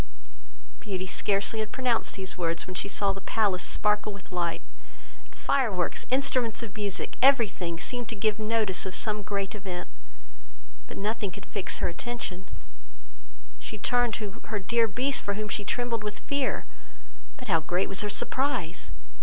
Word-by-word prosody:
Beauty 185 Hz, +3 st, -3 dB
scarcely 200 Hz, +3 st, +1 dB
had 215 Hz, -1 st, -2 dB
pronounced 250 Hz, -3 st, +1 dB
these 190 Hz, -1 st, -4 dB
words, 170 Hz, -2 st, 0 dB
when 185 Hz, -, -6 dB
she 185 Hz, -, 0 dB
saw 200 Hz, -1 st, +2 dB
the 195 Hz, -, -8 dB
palace 195 Hz, -3 st, +1 dB
sparkle 210 Hz, +2 st, +2 dB
with 200 Hz, -2 st, -11 dB
light; 175 Hz, -2 st, -1 dB, 0.6 s
and -, -, -20 dB
fireworks, 215 Hz, -11 st, +1 dB
instruments 255 Hz, -3 st, +2 dB
of 210 Hz, -4 st, -7 dB
music, 205 Hz, -2 st, 0 dB
every 265 Hz, -4 st, +7 dB
thing, 170 Hz, -3 st, -4 dB
seemed 245 Hz, +1 st, -1 dB
to 230 Hz, -, -2 dB
give 215 Hz, +1 st, +1 dB
notice 215 Hz, -4 st, +1 dB
of 185 Hz, -, -1 dB
some 215 Hz, -1 st, +2 dB
great 200 Hz, -1 st, -2 dB
event: 185 Hz, -5 st, -5 dB, 1.0 s
but -, -, -8 dB
nothing 210 Hz, 0 st, -1 dB
could 180 Hz, -, -9 dB
fix 200 Hz, -, -2 dB
her -, -, +1 dB
attention; 190 Hz, -1 st, -4 dB, 1.1 s
she 130 Hz, -, -6 dB
turned 245 Hz, +2 st, +2 dB
to 210 Hz, +1 st, -5 dB
her 215 Hz, -, -2 dB
dear 230 Hz, +3 st, +3 dB
Beast, 255 Hz, +5 st, +1 dB
for 200 Hz, -, -2 dB
whom 215 Hz, +1 st, -2 dB
she 210 Hz, -, -1 dB
trembled 235 Hz, 0 st, -1 dB
with 210 Hz, 0 st, -3 dB
fear; 280 Hz, -2 st, -1 dB, 0.7 s
but 255 Hz, -3 st, -9 dB
how 165 Hz, -5 st, +4 dB
great 175 Hz, +4 st, 0 dB
was 195 Hz, -, +2 dB
her 210 Hz, -, -1 dB
surprise! 205 Hz, -, 0 dB
210 Hz, 165 wpm, -28 LUFS, 190-230 Hz, 1.1 s, every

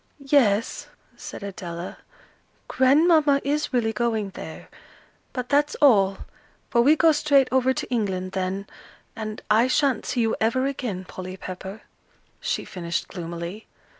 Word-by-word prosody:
"Yes," 225 Hz, -6 st, +3 dB, 0.3 s
said -, -, -9 dB
Adela, 175 Hz, -3 st, -6 dB, 0.7 s
"Grandmamma 290 Hz, +2 st, +4 dB
is 295 Hz, +2 st, -1 dB
really 230 Hz, -4 st, +1 dB
going 220 Hz, -3 st, -1 dB
there. -, -, -9 dB, 0.6 s
But 250 Hz, -1 st, -5 dB
that's 290 Hz, +1 st, +2 dB
all; 195 Hz, -9 st, +4 dB, 0.5 s
for 235 Hz, -, +4 dB
we 290 Hz, +6 st, +5 dB
go 320 Hz, +1 st, +5 dB
straight 285 Hz, -3 st, +3 dB
over 260 Hz, 0 st, +3 dB
to -, -, -3 dB
England 190 Hz, -6 st, -1 dB
then, 190 Hz, +1 st, -2 dB, 0.5 s
and 215 Hz, -1 st, -6 dB
I 225 Hz, +4 st, +5 dB
sha'n't 270 Hz, -2 st, +1 dB
see 245 Hz, -, 0 dB
you 225 Hz, -1 st, +1 dB
ever 235 Hz, +4 st, +2 dB
again, 240 Hz, -9 st, -3 dB
Polly 185 Hz, 0 st, -8 dB
Pepper," 190 Hz, +3 st, -8 dB, 0.6 s
she -, -, -2 dB
finished 170 Hz, -2 st, -4 dB
gloomily. 170 Hz, +3 st, -6 dB
225 Hz, 135 wpm, -24 LUFS, 190-270 Hz, 0.7 s, we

